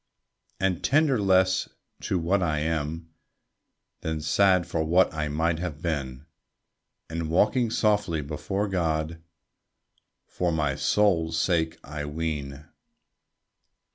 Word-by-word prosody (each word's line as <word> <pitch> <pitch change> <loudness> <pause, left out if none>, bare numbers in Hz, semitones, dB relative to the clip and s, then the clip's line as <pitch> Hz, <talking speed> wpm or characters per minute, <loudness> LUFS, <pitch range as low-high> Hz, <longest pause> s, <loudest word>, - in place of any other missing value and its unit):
And 95 -2 0
tender 140 -5 +3
less 95 -1 +3 0.3
to 95 - -1
what 90 +4 +1
I 80 -4 0
am, 80 +1 -3 0.9
Than 80 -1 -3
sad 90 +4 +3
for 80 - -1
what 85 +3 +3
I 75 -1 -2
might 80 +3 0
have 85 -4 -4
been; 70 -5 -3 0.8
And 80 -1 -4
walking 110 +8 +2
softly 105 -7 +1
before 90 +8 -3
God 80 -3 -1 1.0
For 90 -1 -2
my 75 -3 0
soul's 85 -5 +2
sake, 80 -2 +1
I 75 +1 -5
ween. 75 -2 -4
80 Hz, 110 wpm, -26 LUFS, 75-95 Hz, 1.0 s, tender